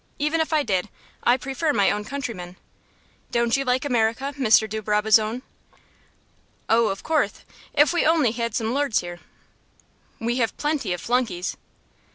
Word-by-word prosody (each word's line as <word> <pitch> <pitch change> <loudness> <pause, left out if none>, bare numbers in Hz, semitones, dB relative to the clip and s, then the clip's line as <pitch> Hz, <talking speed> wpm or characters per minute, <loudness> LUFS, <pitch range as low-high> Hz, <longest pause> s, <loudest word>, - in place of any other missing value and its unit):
Even 300 +3 +1
if 320 - -2
I 310 -2 +3
did, 195 -3 -1 0.3
I 245 +1 +4
prefer 270 +4 -1
my 200 -5 +3
own 210 0 -2
countrymen. 215 -9 -6 0.7
Don't 235 -1 +1
you 275 - 0
like 255 +1 0
America, 245 +2 0
Mr. 220 -5 +4
de 215 +1 -4
Brabazon?" 215 +3 +2 1.2
"Oh, 230 0 +4
of 195 - -4
courth, 315 -1 0 0.3
if 295 +3 +5
we 345 - +2
only 310 -7 +3
had 235 -1 -3
some 225 +1 -1
lords 280 -4 +1
here." 175 0 -8 1.0
"We 235 +2 -1
have 230 -3 0
plenty 295 -8 -1
of 175 -1 -2
flunkeys." 230 -8 -1
235 Hz, 155 wpm, -24 LUFS, 215-280 Hz, 1.2 s, if